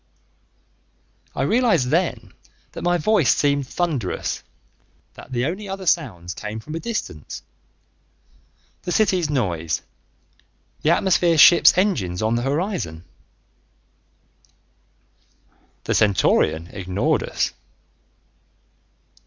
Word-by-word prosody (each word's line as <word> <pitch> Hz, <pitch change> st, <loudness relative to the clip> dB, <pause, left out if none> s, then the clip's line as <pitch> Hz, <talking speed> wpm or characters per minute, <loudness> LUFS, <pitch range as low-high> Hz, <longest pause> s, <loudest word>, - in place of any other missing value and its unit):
I -, -, -1 dB
realized 225 Hz, -, +2 dB
then 170 Hz, +4 st, -1 dB, 0.4 s
that -, -, -8 dB
my 175 Hz, 0 st, +2 dB
voice 175 Hz, -, +3 dB
seemed 140 Hz, -2 st, +1 dB
thunderous, 145 Hz, -, -2 dB, 0.7 s
that -, -, -13 dB
the 125 Hz, 0 st, -1 dB
only 190 Hz, +6 st, -4 dB
other 195 Hz, 0 st, -5 dB
sounds 100 Hz, -, -1 dB
came 105 Hz, +1 st, -6 dB
from 150 Hz, +8 st, -9 dB
a 165 Hz, -, -3 dB
distance: 210 Hz, -, -5 dB, 1.4 s
the 180 Hz, -, -5 dB
city's 185 Hz, -6 st, +2 dB
noise, 85 Hz, -, -1 dB, 1.0 s
the 155 Hz, -, +1 dB
atmosphere 170 Hz, -1 st, +3 dB
ships' 170 Hz, +3 st, +7 dB
engines 110 Hz, -, 0 dB
on 110 Hz, +1 st, +1 dB
the 120 Hz, -, 0 dB
horizon 140 Hz, -, -2 dB, 2.8 s
The -, -, -1 dB
Centaurian 85 Hz, -5 st, +2 dB
ignored 95 Hz, 0 st, -1 dB
us. -, -, -2 dB
145 Hz, 95 wpm, -22 LUFS, -, 2.8 s, ships